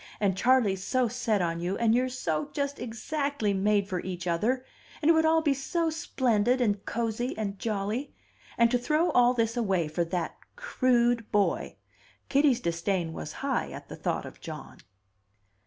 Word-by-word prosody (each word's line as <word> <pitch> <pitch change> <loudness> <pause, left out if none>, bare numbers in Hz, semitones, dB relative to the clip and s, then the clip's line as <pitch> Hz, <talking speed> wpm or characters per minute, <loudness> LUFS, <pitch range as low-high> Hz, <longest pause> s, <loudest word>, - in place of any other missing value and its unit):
And 195 -3 +1
Charley's 210 -4 +3
so 255 +4 +1
set 225 -5 0
on 165 -1 -1
you, 180 +3 -2
and 230 -1 +3
you're 255 +2 +2
so 160 - -2
just 280 0 -2
exactly 245 -1 -2
made 200 +1 +2
for 185 -3 -2
each 180 -1 -5
other, 220 +10 0 0.3
and 315 +2 +4
it - - +6
would 320 0 +3
all 320 0 +3
be 290 -3 +3
so 325 +5 -1
splendid, 250 -6 +1
and 205 -5 +1
cosey, 235 +2 -2
and 200 -3 -3
jolly! 215 +5 -2 0.5
And 235 0 +4
to 245 - +2
throw 305 +7 +1
all 245 0 +4
this 230 0 0
away 195 -8 +1
for 155 +3 -1
that 170 0 -3 0.2
crude 245 - +1
boy!" 205 -2 +1 0.5
Kitty's 275 -3 +4
disdain 170 -1 -1
was 75 - -6
high - - 0
at - - -9
the - - -7
thought - - -2
of - - -11
John. - - -9
230 Hz, 170 wpm, -28 LUFS, 195-255 Hz, 0.5 s, it